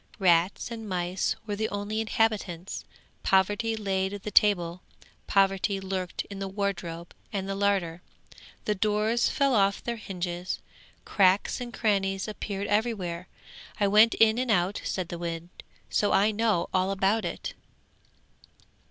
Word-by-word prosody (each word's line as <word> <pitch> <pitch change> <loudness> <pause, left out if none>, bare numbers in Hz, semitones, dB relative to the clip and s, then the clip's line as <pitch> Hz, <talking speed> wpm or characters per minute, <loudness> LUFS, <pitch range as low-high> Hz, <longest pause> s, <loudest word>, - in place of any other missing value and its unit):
Rats 180 +2 +2
and 225 -2 -6
mice 180 0 -1
were 205 -2 -2
the 220 +1 -1
only 205 +2 -2
inhabitants. 210 -5 -1 0.4
Poverty 205 +4 +2
laid 195 -2 -1
the 210 - -4
table; 180 -5 +3 0.5
poverty 195 0 +2
lurked 190 -2 -3
in 200 -1 -8 0.2
wardrobe 175 -4 -3 0.2
and 195 -2 -3
larder. 195 -4 0 0.6
The 210 - +2
doors 215 +3 +1
fell 275 -2 +2
off 200 -3 +2
their 235 -1 -3
hinges, 180 -3 -4 0.5
cracks 195 +4 +3
and 240 -1 -5
crannies 195 -4 0
appeared 200 -1 -4
everywhere; 205 -5 -1 0.5
I 205 - +3
went 215 +3 +6
in 225 +1 +4
and 255 -1 -1
out,' 185 -1 +1
said 185 -2 -3
the 170 - -5
wind, 170 0 -4 0.4
'so 205 - +2
I 200 +3 +4
know 215 -5 +1
all 185 +1 +2
about 195 +3 +1
it. - - -4
195 Hz, 135 wpm, -27 LUFS, 185-215 Hz, 0.6 s, went